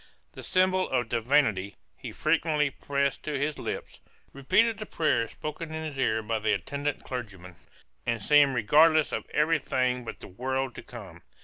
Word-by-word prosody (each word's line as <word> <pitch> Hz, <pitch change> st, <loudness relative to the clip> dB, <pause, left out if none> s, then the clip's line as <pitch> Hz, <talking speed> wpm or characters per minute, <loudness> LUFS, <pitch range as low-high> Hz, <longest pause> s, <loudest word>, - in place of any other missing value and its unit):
The -, -, -10 dB
symbol 185 Hz, 0 st, +1 dB
of 125 Hz, -3 st, 0 dB
divinity 115 Hz, -5 st, +1 dB, 0.2 s
he -, -, -8 dB
frequently 155 Hz, -2 st, +1 dB
pressed 140 Hz, 0 st, -1 dB
to 150 Hz, -2 st, -3 dB
his 145 Hz, +2 st, -2 dB
lips, -, -, -5 dB, 0.3 s
repeated 210 Hz, -, +2 dB
the 215 Hz, -, -6 dB
prayers 120 Hz, -8 st, 0 dB
spoken 155 Hz, +2 st, -6 dB
in 160 Hz, 0 st, -4 dB
his 145 Hz, -3 st, -6 dB
ear 110 Hz, -4 st, +1 dB
by 110 Hz, +1 st, -1 dB
the 110 Hz, -, +1 dB
attendant 145 Hz, 0 st, -3 dB
clergyman, 95 Hz, -8 st, -7 dB, 0.5 s
and 115 Hz, -, -1 dB
seemed 140 Hz, +4 st, +4 dB
regardless 155 Hz, +7 st, +4 dB
of -, -, -4 dB
every 155 Hz, +1 st, +2 dB
thing 125 Hz, -2 st, 0 dB
but 115 Hz, -, -8 dB
the -, -, -10 dB
world 130 Hz, +5 st, -3 dB
to -, -, -8 dB
come. -, -, -11 dB
140 Hz, 170 wpm, -28 LUFS, 115-155 Hz, 0.5 s, seemed